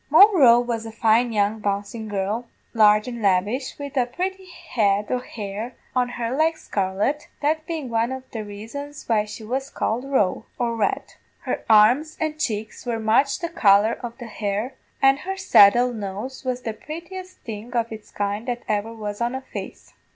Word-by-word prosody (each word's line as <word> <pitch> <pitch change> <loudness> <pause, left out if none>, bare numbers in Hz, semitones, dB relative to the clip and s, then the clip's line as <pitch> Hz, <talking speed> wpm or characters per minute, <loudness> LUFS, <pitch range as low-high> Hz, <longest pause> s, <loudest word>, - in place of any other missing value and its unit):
"Moll 400 +8 +8
Roe 240 -7 +7
was 235 -2 -2
a - - -7
fine 230 +2 +3
young 210 0 +1
bouncin' 205 +2 -3
girl, 205 +4 -2 0.3
large 210 0 +5
and 235 -2 -5
lavish, 205 +7 +1
wid 285 -1 -7
a 250 -2 +2
purty 375 +7 -4
head 215 - 0
o' 250 - +1
hair 220 0 -6 0.2
on 250 -1 +2
her 240 0 -3
like 315 +2 +2
scarlet, 200 +10 -1
that 310 +2 0
bein' 320 -5 -3
one 230 +1 0
of 260 0 -5
the 220 -2 -4
raisons 225 +9 -8
why 215 -2 +2
she 215 +1 -9
was 265 +5 -3
called 235 -1 -1
Roe, 215 -5 +1
or 235 -1 -1
red; 215 -3 -1 0.3
her - - -3
arms 235 +9 +5
an' 310 -1 -2
cheeks 215 -6 -3
were 240 -2 -2
much 225 +6 +2
the 340 - -4
colour 210 - +4
of 235 -1 -6
the 245 - -8
hair, 215 +2 -3 0.3
an' 270 0 +6
her 385 +6 -5
saddle 240 - +6
nose 215 +5 -6
was 255 -1 -3
the 225 - -3
purtiest 360 - -8
thing 220 +1 -7
of 230 -1 0
its 220 -1 -9
kind 205 +3 -3
that 240 -1 -3
ever 210 +1 -1
was 210 -1 -6
on 240 +2 0
a 265 - -4
face. 265 - -9
235 Hz, 185 wpm, -23 LUFS, 210-270 Hz, 0.3 s, Moll